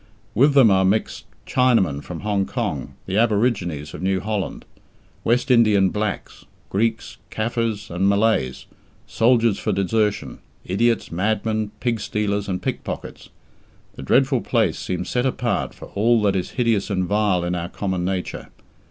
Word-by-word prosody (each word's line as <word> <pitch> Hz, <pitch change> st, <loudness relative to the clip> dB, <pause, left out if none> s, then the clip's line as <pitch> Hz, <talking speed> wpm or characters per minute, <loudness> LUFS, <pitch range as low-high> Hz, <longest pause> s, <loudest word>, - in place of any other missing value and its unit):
With 140 Hz, +6 st, +4 dB
them 125 Hz, -7 st, +7 dB
are 95 Hz, 0 st, +4 dB
mixed 100 Hz, +3 st, 0 dB, 0.2 s
Chinamen 115 Hz, -, +2 dB
from 85 Hz, -3 st, -7 dB
Hong 100 Hz, -2 st, 0 dB
Kong, -, -, -3 dB
the 95 Hz, +3 st, 0 dB
Aborigines 100 Hz, -, 0 dB
of -, -, -7 dB
New 95 Hz, 0 st, +1 dB
Holland, 105 Hz, 0 st, -3 dB, 0.6 s
West 125 Hz, +3 st, +1 dB
Indian 105 Hz, -5 st, +5 dB
blacks, 105 Hz, -3 st, -4 dB, 0.3 s
Greeks, 110 Hz, +2 st, -1 dB
Caffres, 115 Hz, -1 st, -2 dB
and 95 Hz, +3 st, +1 dB
Malays, 100 Hz, -, +1 dB, 0.4 s
soldiers 115 Hz, -3 st, +2 dB
for 110 Hz, -, -1 dB
desertion, 105 Hz, +2 st, 0 dB, 0.3 s
idiots, 115 Hz, +5 st, +1 dB
madmen, 110 Hz, +3 st, -1 dB
pig 120 Hz, -3 st, -1 dB
stealers, 105 Hz, -1 st, -2 dB
and 90 Hz, -1 st, -3 dB
pick -, -, -3 dB
pockets. -, -, -7 dB, 0.6 s
The -, -, -10 dB
dreadful 130 Hz, -, +2 dB
place 110 Hz, -9 st, 0 dB
seems 90 Hz, 0 st, -3 dB
set 125 Hz, +1 st, 0 dB
apart 125 Hz, -2 st, -1 dB
for -, -, -12 dB
all 115 Hz, +3 st, +2 dB
that 100 Hz, -1 st, +2 dB
is 90 Hz, -, -2 dB
hideous 115 Hz, -5 st, +1 dB
and 95 Hz, -2 st, 0 dB
vile 100 Hz, -2 st, +1 dB
in 90 Hz, +1 st, -1 dB
our 85 Hz, -1 st, -3 dB
common 95 Hz, -3 st, -3 dB
nature. 90 Hz, 0 st, -3 dB
105 Hz, 150 wpm, -22 LUFS, 95-115 Hz, 0.6 s, them